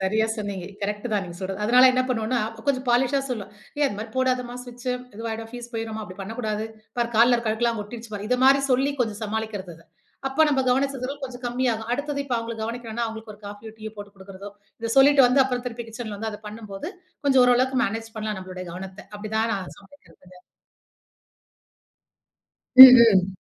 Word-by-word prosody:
சரியா 215 +4 +1
சொன்னீங்க. 200 -4 -5 0.2
கரெக்ட் 210 +3 -3
தான் 205 -2 +1
நீங்க 170 -1 -9
சொல்றது. 190 +1 -5
அதனால 250 +3 +6
என்ன 255 - +2
பண்ணுவன்னா, 245 0 0 0.3
கொஞ்சம் 270 -2 0
பாலிஷா 260 +3 +2
சொல்லுவேன், 210 -5 -5 0.3
"ஏய், 295 - +3
அது 235 - -3
மாதிரி 220 +1 -7
போடாதம்மா, 255 -1 0
ஸ்விட்ச் 245 0 -12 0.3
இதுவாயிடும் 225 0 -6
ஃபீஸ் 240 -1 -8
போயிடும்மா. 225 -1 -4
அப்படி 185 -1 -12
பண்ணக்கூடாது, 215 +1 -4 0.3
பாரு 235 -1 0
கால்ல 240 +2 +6
இருக்கழுக்கெல்லாங் 230 0 -1
ஒட்டிருச்சு 225 +1 -10
பாரு!" 205 0 -5
இது 250 - +1
மாதிரி 275 +1 +6
சொல்லி 270 +3 +2
கொஞ்சம் 220 -3 -1
சமாளிக்கிறது 210 -4 -4
அத. 165 - -20 0.4
அப்ப 270 +4 +2
நம்ம 275 -3 +2
கவனிச்சதுல 270 0 -1
கொஞ்சம் 250 -1 -9
கம்மியாகும். 240 -2 -1
அடுத்தது 285 +2 -2
இப்ப 255 -3 -2
அவங்கள 230 0 -5
கவனிக்கணும்னா 230 0 -4
அவங்களுக்கு 220 -1 -8
ஒரு 205 - -22
காஃபியோ 205 +2 -9
டீயோ 220 0 -7
போட்டு 205 0 -10
கொடுக்கிறதோ, 195 +1 -10 0.3
இத 230 0 -3
சொல்லிட்டு 275 0 +7
வந்து 265 +2 +4
அப்றம் 250 -1 -3
திருப்பி 235 -1 -6
கிட்சன்ல 220 -2 -7
வந்து 220 +1 -3
அத 210 - -8
பண்ணும்போது 210 - -7 0.3
கொஞ்சம் 265 -2 +5
ஓரளவுக்கு 255 +1 +3
மேனேஜ் 225 +2 -5
பண்ணலாம் 215 -2 -3
நம்மளோடைய 185 -1 -8
கவனத்த. 190 +2 -8 0.2
அப்டி 210 +1 -8
தான் 225 +1 +1
நான் 190 -2 -6
சமைக்கிறதுங்க. 195 -5 -19 2.4
ம், 260 -1 +13 0.2
ம். 190 0 +1
225 Hz, 175 wpm, -24 LUFS, 210-250 Hz, 2.4 s, ம்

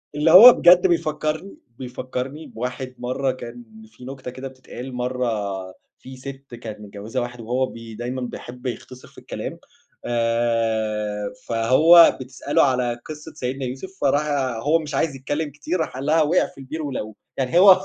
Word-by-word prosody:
اللي 155 +2 +3
هو 230 +8 +12
بجد 180 +2 +6
بيفكّرني 155 +2 -1 0.2
بيفكّرني 130 +4 -5
بواحد 125 +2 -5
مَرّة 130 +2 -1
كان 120 -1 -9 0.2
في 115 +3 -15
نكتة 130 -1 -7
كده 130 +1 -7
بتتقال، 130 0 -9
مَرّة 125 0 -1 0.7
في 130 0 -11
ست 135 -1 -9
كانت 110 -2 -8
متجوّزة 105 +4 -5
واحد 120 0 -6
وهو 125 +3 0
بي 115 -3 -10
دايمًا 125 +3 -4
بيحب 125 +1 -8
يختصِر 125 +1 -6
في - - -23
الكلام، - - -6 0.5
آآ 110 -3 0
فهو 130 +9 +6
بتسأله 130 +1 0
على 125 -3 +1
قصّة 155 0 -9
سيدنا 130 -1 -4
يوسف 130 +9 -6
فراح 145 +2 +2 0.4
هو 160 +3 +3
مش 150 -3 -5
عايز 145 -1 0
يتكلّم 145 +3 -3
كتير، 155 +5 -3
راح 160 - -2
قال 135 +2 -5
لها 160 +1 +3
وقع 160 +4 +3
في - - -20
البير 150 +4 -6
ولقوه، 110 -7 -5 0.2
يعني 135 +6 +2
هو 190 -1 +8
130 Hz, 160 wpm, -22 LUFS, 120-150 Hz, 0.7 s, هو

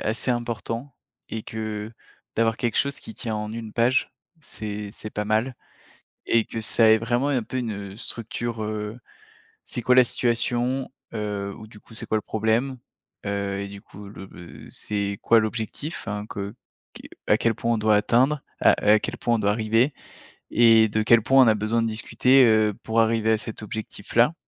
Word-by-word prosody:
assez 110 +4 -1
important 120 +2 -3 0.3
et 110 -1 -4
que, 110 -1 -5 0.5
d'avoir 115 0 +2
quelque 120 -3 -1
chose 140 0 0
qui 225 - -10
tient 115 - -4
en 105 0 -4
1 115 -1 -6
page, 120 +3 +2 0.3
c'est 105 -6 -6
c'est 110 - -9
pas 105 - -3
mal 110 +4 0 0.7
et 115 -1 +3
que 115 - -5
ça 110 +1 +3
ait 110 - +7
vraiment, 120 +5 0
un 130 -4 +1
peu, 130 - -5
une, 120 -3 -2 0.2
heu, - - -12
structure, 115 0 -5
heu, 105 +2 -4 0.7
c'est 120 - -5
quoi 125 - +4
la 130 - +8
situation? 120 +2 0 0.2
Heu, 105 -2 -3
ou, 110 - -10
du 105 -1 -15
coup, - - -18
c'est - - -7
quoi 110 - 0
le 105 - -1
problème? 115 +4 0 0.5
Heu, 100 -1 -2
et 100 - -5
du 100 0 -10
coup, 100 0 -12
le 100 -1 -10
le 85 -1 -12
c'est 100 -1 -2
quoi 115 -1 +5
l'objectif? 110 +8 -4
Hein, 105 0 -3
que 100 +1 -5 0.4
qui - - -11 0.2
à - - +4
quel 115 -1 +1
point 115 +3 -1
on 115 - +1
doit 110 -1 +3
atteindre 130 +7 +2 0.2
heu, - - +8
à 105 +1 +5
quel - - -4
point 120 - +1
on - - +1
doit 100 - +2
arriver? 115 +5 +2 0.6
Et 115 -1 +6
de 110 +1 0
quel 115 0 +5
point 135 +3 +6
on 115 - +4
a 110 - +5
besoin 110 +2 0
de 115 - 0
discuter, 125 +4 +3
heu, 110 -2 +4
pour 115 +1 +1
arriver 110 0 +2
à 110 - +2
cet 110 0 -7
objectif 105 -1 -7
là? 125 +8 +5
110 Hz, 195 wpm, -24 LUFS, 105-120 Hz, 0.7 s, la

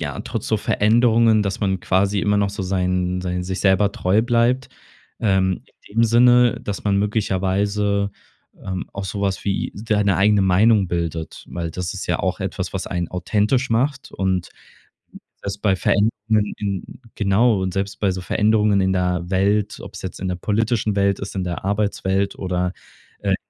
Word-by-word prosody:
ja, 70 -4 -4
trotz - - -4
so - - +2
Veränderungen, 115 0 +3
dass 100 0 -3
man 95 -2 0
quasi 100 +3 +1
immer 105 +1 +2
noch 100 -1 +2
so 100 -1 -5
sein 90 -1 0
sein 90 0 -2
sich 95 +1 -4
selber 100 +1 +3
treu 100 +4 +2
bleibt, 120 +2 +1 0.5
ähm, 95 -3 +1 0.3
in 105 - -14
dem 115 - +6
Sinne, 120 +1 +5
dass 100 0 -4
man 100 -1 +2
möglicherweise, 100 0 0 0.5
ähm, 95 -1 -4
auch 100 0 -4
so 100 +2 -4
was 100 -1 -1
wie 100 -1 -1
s 105 - -9
deine 105 -4 +2
eigene 105 +2 +4
Meinung 95 +1 +4
bildet, 85 -2 -4
weil 85 -1 -4
das 90 +1 -4
ist - - -6
ja - - 0
auch - - -2
etwas, - - -3
was - - -3
einen 90 -1 -2
authentisch 105 +8 0
macht 130 +4 0
und 95 -3 -1 0.9
selbst 100 +1 -5
bei 100 -3 +3
Veränderungen 105 +1 +1
in 100 -3 -3 0.3
genau, 105 +1 +2
und 95 -1 -2
selbst 100 +1 -3
bei 100 -2 +2
so 95 - -4
Veränderungen 105 +2 +2
in 95 0 +1
der 90 -1 -1
Welt, 100 +2 +1
ob's - - -9
jetzt 95 - -6
in 95 - -2
der 90 - -1
politischen 110 +2 0
Welt 100 0 +2
ist, 100 0 -6
in 95 - -1
der 90 +1 -4
Arbeitswelt 100 -1 0
oder, 90 -1 -2 0.5
äh, - - -2
in - - +4
100 Hz, 180 wpm, -21 LUFS, 95-105 Hz, 0.9 s, dem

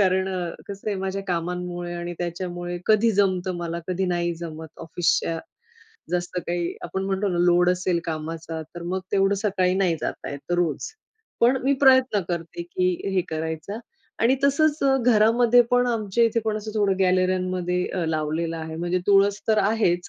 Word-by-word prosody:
कारण 190 -1 +2
अ, 175 -2 -2 0.2
कसं 200 +1 -6
आहे 205 - -1
माझ्या 190 +1 -3
कामांमुळे 175 0 -3
आणि 175 0 -5
त्याच्यामुळे 175 0 -4
कधी 220 +1 +4
जमतं 185 -2 +1
मला 170 0 -4
कधी 185 +1 0
नाही 175 -1 0
जमत. 160 -1 -7
ऑफिसच्या 165 0 0 0.7
जास्त 180 0 -2
काही 175 0 -2
आपण 190 - -3
म्हणतो 195 +1 0
ना, 175 -2 -1
लोड 175 0 +4
असेल 180 -1 0
कामाचा, 160 0 -5
तर 175 - -7
मग 180 +2 -2
तेवढं 195 0 +3
सकाळी 190 -3 +1
नाही 185 -4 +2
जाता - - -4
येतं 145 +5 -4
रोज, 170 -5 0 0.6
पण 245 +3 +5
मी 275 - +4
प्रयत्न 260 -5 +5
करते 175 - -4
की 365 +1 0 0.2
हे 185 - +4
करायचा 160 +5 -4 0.4
आणि 245 +4 +4
तसंच 300 +2 +3
अ, 270 -1 +4
घरामध्ये 235 +2 +5
पण 245 0 +3
आमच्या 225 -1 +1
इथे 230 0 +1
पण 215 -1 0
असं 215 +1 -6
थोडं 200 -3 +2
गॅलरीमध्ये 185 -1 +1
अ, 180 -3 -2
लावलेलं 160 +1 -1
आहे 160 0 -6
म्हणजे 175 +2 0
तुळस 200 0 +4
तर 215 -1 +4
आहेच, 195 -4 +1
185 Hz, 165 wpm, -24 LUFS, 175-205 Hz, 0.7 s, पण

